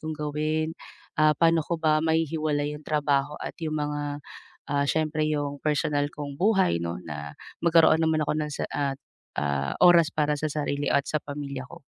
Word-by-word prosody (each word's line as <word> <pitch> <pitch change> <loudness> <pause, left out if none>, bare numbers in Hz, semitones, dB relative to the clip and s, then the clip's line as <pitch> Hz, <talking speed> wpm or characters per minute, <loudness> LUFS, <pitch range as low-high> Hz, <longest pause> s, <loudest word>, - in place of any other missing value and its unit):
kong 155 0 -4
gawin, 155 +1 -1 0.5
ah, 155 0 +6
pa'no 165 -1 +3
ko 170 - -1
ba 155 -1 +3
mahihiwalay 155 -2 0
'yung 150 - -14
trabaho 145 -1 +1
at - - -5
'yung 155 0 -2
mga, 145 0 -3 0.5
ah, 140 0 +1
siyempre 155 -1 +1
'yung 145 -1 -1
personal 150 -1 +1
kong 145 -1 -6
buhay 190 - +3
'no 85 +1 -3
na 75 -2 -6 0.3
magkaroon 165 -1 +6
naman 160 -1 +2
ako - - +2
ng 150 - -6
sa - - -3
at, 140 -1 -1 0.4
ah, 70 -1 -1
oras 170 -3 +7
para 150 -1 +1
sa 155 - -1
sarili 145 -1 -1
at 140 - +3
sa 155 - 0
pamilya 140 -2 -5
ko? - - -12
150 Hz, 175 wpm, -26 LUFS, 145-155 Hz, 0.5 s, oras